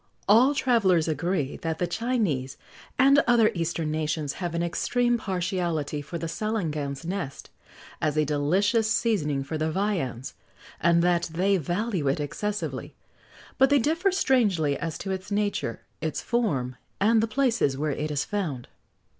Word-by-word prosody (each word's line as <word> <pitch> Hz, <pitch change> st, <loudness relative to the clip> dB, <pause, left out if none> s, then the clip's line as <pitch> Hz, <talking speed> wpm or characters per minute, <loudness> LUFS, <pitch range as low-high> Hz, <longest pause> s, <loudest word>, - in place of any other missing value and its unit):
[XX -, -, -20 dB
103] 230 Hz, +5 st, +7 dB
All 290 Hz, -, 0 dB
travellers 200 Hz, -, +3 dB
agree 160 Hz, -1 st, -1 dB
that 160 Hz, -1 st, -3 dB
the 175 Hz, -, 0 dB
Chinese, 175 Hz, -, -1 dB, 0.4 s
and 275 Hz, +2 st, +6 dB
other 235 Hz, -3 st, +5 dB
eastern 165 Hz, -2 st, -2 dB
nations, 155 Hz, -2 st, -1 dB
have 175 Hz, -2 st, -2 dB
an 170 Hz, -, 0 dB
extreme 240 Hz, +7 st, +1 dB
partiality 175 Hz, -7 st, -2 dB
for 160 Hz, +4 st, -6 dB
the 165 Hz, -, -4 dB
salangan's 160 Hz, -7 st, -3 dB
nest, 175 Hz, -6 st, -5 dB, 0.5 s
as 150 Hz, -1 st, 0 dB
a 155 Hz, -, +3 dB
delicious 190 Hz, +10 st, +1 dB
seasoning 150 Hz, -, +1 dB
for 155 Hz, +3 st, -4 dB
their 155 Hz, +1 st, 0 dB
viands, 160 Hz, -, -2 dB, 0.5 s
and 170 Hz, 0 st, +3 dB
that 175 Hz, -1 st, +2 dB
they 190 Hz, +4 st, +2 dB
value 180 Hz, 0 st, -1 dB
it 135 Hz, +3 st, +1 dB
excessively; 210 Hz, +8 st, -4 dB, 0.6 s
but 265 Hz, 0 st, +6 dB
they 285 Hz, -, +5 dB
differ 325 Hz, -, +1 dB
strangely 205 Hz, -, +2 dB
as 160 Hz, +1 st, -4 dB
to 195 Hz, -, -5 dB
its 190 Hz, +1 st, -4 dB
nature, 205 Hz, -, -1 dB, 0.2 s
its 160 Hz, -1 st, -2 dB
form, 140 Hz, -, -1 dB, 0.2 s
and 220 Hz, +2 st, +4 dB
the 225 Hz, -, +1 dB
places 230 Hz, -, +1 dB
where 150 Hz, +1 st, -1 dB
it 150 Hz, +2 st, -3 dB
is 150 Hz, -1 st, -1 dB
found. 160 Hz, -12 st, -3 dB
175 Hz, 155 wpm, -26 LUFS, 150-215 Hz, 0.6 s, 103